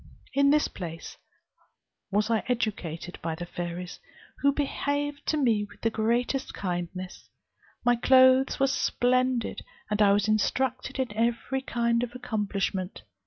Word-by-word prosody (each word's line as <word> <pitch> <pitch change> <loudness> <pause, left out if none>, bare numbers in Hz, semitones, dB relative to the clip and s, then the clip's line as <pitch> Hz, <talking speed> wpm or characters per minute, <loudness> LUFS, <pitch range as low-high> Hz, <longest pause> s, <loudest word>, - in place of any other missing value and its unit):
In 280 +1 +4
this 300 +1 +4
place 165 -3 -7 0.9
was 210 +3 +1
I 225 - +2
educated 190 -8 -3
by 165 -1 -2
the 175 - -6
fairies, 175 +1 -6 0.4
who 280 - +4
behaved 285 0 -2
to 310 - +1
me 230 -7 +2
with 205 - -12
the 225 - +1
greatest 240 +5 0
kindness; 180 0 -5 0.6
my 245 0 +5
clothes 260 +2 +5
were 270 - +4
splendid, 255 -2 +1 0.3
and 210 0 +1
I 200 -1 +6
was 205 +1 +2
instructed 255 +5 0
in 255 -5 -1
every 235 +4 0
kind 235 -2 0
of 245 0 -4
accomplishment. 205 -5 -2
235 Hz, 135 wpm, -27 LUFS, 200-260 Hz, 0.9 s, I